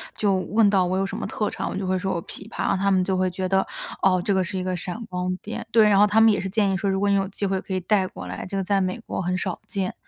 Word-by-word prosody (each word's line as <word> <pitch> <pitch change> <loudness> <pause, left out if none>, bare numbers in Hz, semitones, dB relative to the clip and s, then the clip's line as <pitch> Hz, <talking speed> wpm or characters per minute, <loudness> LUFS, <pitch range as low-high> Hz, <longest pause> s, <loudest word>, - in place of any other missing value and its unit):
就 205 -2 +1
问 205 +3 +3
到 190 -3 +3
我 185 +1 0
有 195 - +1
什 - - -5
么 - - -3
特 210 - -2
长， - - -4
我 - - -5
就 190 0 -3
会 185 0 0
说： 190 -1 -1
“哦 170 - -3
琵 195 - -8
琶。” 200 -4 -1
他 200 0 +3
们 185 -1 +3
就 190 0 0
会 185 0 +1
觉 185 +1 -3
得： 190 0 +2 0.4
“哦， 185 -2 +3
这 200 - +1
个 190 - +2
是 185 +2 -3
一 185 - -2
个 185 0 -1
闪 185 +7 -5
光 180 0 -2
点。” 220 - -5
对， 225 -1 +6
然 200 -1 +5
后 210 - +6
他 220 +2 +4
们 225 -1 +7
也 - - +1
是 190 - -3
建 200 -1 +1
议 190 - 0
说： 200 +1 -1
“如 190 - +1
果 200 0 +1
你 200 - +4
有 195 -1 +1
机 200 +1 -4
会 190 -1 0
可 190 - -6
以 185 - 0
带 190 0 +2
过 - - -9
来， - - -6
这 195 - -5
个 195 - 0
在 200 +1 +1
美 185 +1 -1
国 - - -3
很 180 +1 -1
少 185 -2 -3
见。” 195 -3 -2
190 Hz, 355 characters per minute, -24 LUFS, 185-200 Hz, 0.4 s, 们